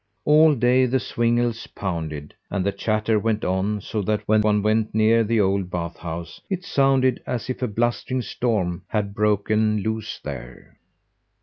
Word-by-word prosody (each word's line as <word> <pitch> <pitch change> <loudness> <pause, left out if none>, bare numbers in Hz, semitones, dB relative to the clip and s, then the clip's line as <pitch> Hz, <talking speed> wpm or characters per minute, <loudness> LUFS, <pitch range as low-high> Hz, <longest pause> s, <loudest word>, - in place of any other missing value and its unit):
All 155 0 +6
day 125 +1 +3
the 130 +2 +1
swingles 120 -1 0
pounded, 80 -6 -5 0.2
and 95 -2 -2
the 100 - +2
chatter 110 +1 0
went 110 0 -1
on, 95 +3 0
so 105 +3 -3
that 105 +1 -2
when 110 0 +4
one 105 -1 +2
went 110 0 +1
near 110 +1 +4
the 110 +1 +1
old 95 -2 +1
bath 85 -1 -4
house 85 0 -7
it 185 -2 -3
sounded 135 -2 +2
as 125 +1 -3
if 130 - -7
a 125 - +1
blustering 120 +3 -1
storm 105 -9 -1
had 100 -2 -2
broken 105 0 +1
loose 110 -1 -3
there. - - -9
110 Hz, 165 wpm, -23 LUFS, 100-120 Hz, 0.2 s, All